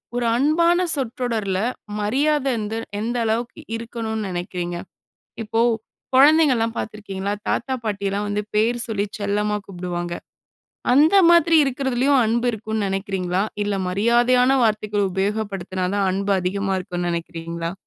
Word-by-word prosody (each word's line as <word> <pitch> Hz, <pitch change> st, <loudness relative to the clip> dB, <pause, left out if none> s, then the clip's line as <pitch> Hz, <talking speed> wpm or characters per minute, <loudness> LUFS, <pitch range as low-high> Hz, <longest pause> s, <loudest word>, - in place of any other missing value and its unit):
ஒரு 245 Hz, -1 st, 0 dB
அன்பான 335 Hz, +5 st, +3 dB, 0.2 s
சொற்றொடர்ல, 230 Hz, -7 st, -2 dB, 0.4 s
மரியாத 275 Hz, +7 st, +1 dB
எந்த 215 Hz, 0 st, -3 dB, 0.2 s
எந்த 235 Hz, +3 st, -2 dB
அளவுக்கு 230 Hz, +2 st, -2 dB
இருக்கணுன்னு 225 Hz, -2 st, -4 dB
நினைக்கிறீங்க? 175 Hz, -1 st, -4 dB, 0.7 s
இப்போ 225 Hz, +1 st, -2 dB, 0.6 s
கொழந்தைங்கள்லாம் 265 Hz, -5 st, +5 dB
பாத்துருக்கீங்களா, 200 Hz, -2 st, -4 dB
தாத்தா 260 Hz, +3 st, -1 dB
பாட்டியல்லாம் 200 Hz, -1 st, -2 dB
வந்து 205 Hz, 0 st, -1 dB
பேரு 230 Hz, +3 st, +2 dB
சொல்லி 205 Hz, -2 st, -1 dB
செல்லமா 210 Hz, +1 st, 0 dB
கூப்டுவாங்க. 175 Hz, -2 st, -4 dB, 0.8 s
அந்த 305 Hz, +8 st, +5 dB
மாதிரி 340 Hz, -1 st, +5 dB
இருக்குறதுலயும் 270 Hz, 0 st, +1 dB
அன்பு 235 Hz, +2 st, +1 dB
இருக்குன்னு 220 Hz, -1 st, -3 dB
நெனைக்கிறீங்களா? 190 Hz, -1 st, -1 dB, 0.2 s
இல்ல 205 Hz, -1 st, -1 dB
மரியாதையான 240 Hz, +6 st, +3 dB
வார்த்தைகள் 210 Hz, -2 st, +1 dB
உபயோகப்படுத்தினா 195 Hz, -1 st, -2 dB
தான், 200 Hz, -1 st, +1 dB
அன்பு 200 Hz, +2 st, -1 dB
அதிகமா 195 Hz, +2 st, -1 dB
இருக்குன்னு 175 Hz, -1 st, -3 dB
நினைக்கிறீங்களா? 170 Hz, 0 st, -4 dB
215 Hz, 115 wpm, -22 LUFS, 195-245 Hz, 0.8 s, கொழந்தைங்கள்லாம்